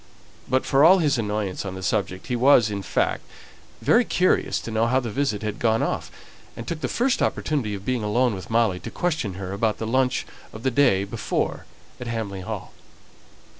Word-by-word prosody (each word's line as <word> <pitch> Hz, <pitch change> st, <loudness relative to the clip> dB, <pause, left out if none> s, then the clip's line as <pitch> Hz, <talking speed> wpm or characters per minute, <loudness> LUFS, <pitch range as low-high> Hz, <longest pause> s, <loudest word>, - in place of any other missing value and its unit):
But 130 Hz, 0 st, +1 dB
for 135 Hz, +1 st, +3 dB
all 180 Hz, +4 st, +8 dB
his 145 Hz, -7 st, +1 dB
annoyance 105 Hz, -3 st, -2 dB
on 95 Hz, -2 st, -5 dB
the 95 Hz, -, -7 dB
subject, 95 Hz, -2 st, -1 dB
he 125 Hz, -, -2 dB
was, 120 Hz, -3 st, +5 dB
in 100 Hz, -1 st, -3 dB
fact, 95 Hz, -, 0 dB, 0.6 s
very -, -, +5 dB
curious -, -, +1 dB
to 115 Hz, -, -6 dB
know 110 Hz, +1 st, +2 dB
how 130 Hz, +2 st, +3 dB
the 120 Hz, -4 st, -4 dB
visit 130 Hz, -5 st, -1 dB
had 105 Hz, 0 st, -3 dB
gone 115 Hz, -1 st, +2 dB
off, -, -, -2 dB, 0.5 s
and 115 Hz, -, -7 dB
took 165 Hz, -2 st, -4 dB
the -, -, -1 dB
first 250 Hz, +2 st, +1 dB
opportunity 125 Hz, -9 st, -1 dB
of 100 Hz, 0 st, -9 dB
being 125 Hz, -2 st, 0 dB
alone 115 Hz, +3 st, +1 dB
with 95 Hz, -4 st, -7 dB
Molly 110 Hz, -5 st, +2 dB
to -, -, -7 dB
question 155 Hz, -, -2 dB
her 95 Hz, 0 st, -5 dB
about 110 Hz, +2 st, 0 dB
the 110 Hz, -, -4 dB
lunch 130 Hz, +2 st, +1 dB, 0.3 s
of 110 Hz, -, -9 dB
the 130 Hz, -, +1 dB
day 115 Hz, -7 st, +3 dB
before 100 Hz, -, -3 dB, 0.3 s
at 125 Hz, -, -6 dB
Hamley 110 Hz, -5 st, -4 dB
Hall. 90 Hz, -, -6 dB
115 Hz, 200 wpm, -24 LUFS, 100-130 Hz, 0.6 s, all